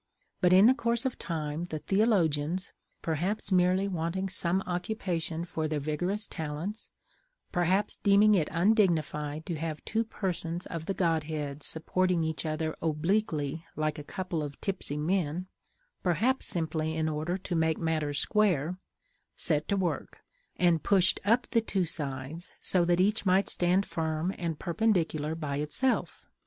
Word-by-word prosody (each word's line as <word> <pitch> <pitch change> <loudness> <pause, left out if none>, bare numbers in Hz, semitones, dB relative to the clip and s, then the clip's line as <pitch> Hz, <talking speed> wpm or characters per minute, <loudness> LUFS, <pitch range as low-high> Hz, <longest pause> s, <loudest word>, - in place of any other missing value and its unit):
But 180 -2 +4
in 200 +7 +8
course 235 -2 -1
of 260 - -2
time 160 -1 -3
the 160 -3 -4
theologians 180 -4 +1 0.3
(perhaps 175 +7 -1
merely 185 +1 +3
wanting 185 +1 -2
some 180 +1 0
occupation 175 -3 -2
for 160 -2 -2
their 155 -1 -1
vigorous 175 +9 -2
talents, 160 +7 -4 0.6
perhaps 185 +3 +1
deeming 205 +1 +5
it 165 -7 +2
undignified 165 -6 +1
to 170 - -3
have 160 -2 -4
two 225 +1 0
persons 175 -5 -3
of 165 -1 -6
the 195 - -1
godhead 155 -4 -1
supporting 175 +3 +1
each 160 0 -2
other 155 0 -2
obliquely 160 -2 0
like 155 0 -1
a - - -6
couple 180 +1 -3
of 145 -1 -6
tipsy 185 -7 -3
men, 170 +1 0 0.6
perhaps 220 +10 +1
simply 160 -2 -1
in 160 0 +1
order 155 +4 -1
to 185 -1 -5
make 160 -1 +2
matters 155 -3 -1
square) 180 -4 +1 0.6
set 150 -2 0
to 200 - +1
work, 180 -3 -3 0.3
and 175 -3 +3
pushed 190 -2 +3
up 230 +5 +3
the 230 - +4
two 195 -4 0
sides, 145 +1 -4
so 180 -2 +5
that 175 0 +2
each 205 +4 +2
might 190 0 +3
stand 180 +3 +2
firm 160 +2 -2
and 165 -3 -2
perpendicular 170 -5 0
by 150 -4 -3
itself. 150 - -1
170 Hz, 145 wpm, -29 LUFS, 155-190 Hz, 0.6 s, in